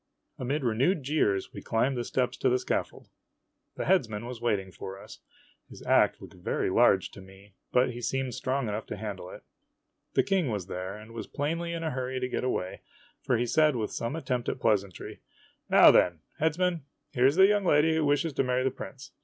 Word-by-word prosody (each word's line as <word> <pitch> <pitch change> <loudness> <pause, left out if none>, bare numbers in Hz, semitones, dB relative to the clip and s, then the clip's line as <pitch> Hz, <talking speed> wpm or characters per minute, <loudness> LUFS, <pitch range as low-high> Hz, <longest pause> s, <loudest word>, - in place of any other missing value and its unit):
Amid 135 +4 -2
renewed 130 - +1
jeers, 115 -9 0
we - - -7
climbed 125 +4 0
the 120 - -2
steps 125 +1 -1
to 130 - +2
the 125 - +3
scaffold. - - -3 0.7
The - - -3
headsman 115 - +1
was 120 -1 -7
waiting 100 -5 -1
for 95 +1 -8
us. - - -12 0.5
His - - -12
ax - - +3
looked - - -12
very 90 +1 -2
large 100 -3 +4
to 100 - -11
me, 95 +1 -16 0.2
but 125 0 +3
he 120 0 -8
seemed 135 0 -2
strong 130 0 -1
enough 105 +1 -4
to - - -5
handle 100 -4 -6
it. - - -11 0.7
The - - +4
King 190 -8 +1
was 105 -5 -3
there, 95 +2 -5
and 110 +1 -12
was 115 -2 -7
plainly 165 +4 -2
in 165 -1 -4
a 160 - -1
hurry 130 0 -3
to 125 - -1
get 125 - -3
away, 95 -7 -2 0.4
for 125 - +1
he 120 - 0
said 150 +3 +3
with 110 -3 -2
some 115 +6 -3
at 165 - -6
tempt 125 -2 -1
at - - -4
pleasantry: 100 -5 -1 0.3
" - - -39
Now, - - +8
then, 85 -3 +3 0.2
Headsman, 165 +1 +1 0.3
here 125 +1 +4
's 140 - -2
the 190 +1 +7
young 205 0 +3
lady 160 -2 +4
who 160 0 +1
wishes 145 +2 +1
to 135 - +1
marry 125 0 0
the 130 - +1
prince. 135 +2 -10
125 Hz, 210 wpm, -28 LUFS, 105-145 Hz, 0.7 s, Now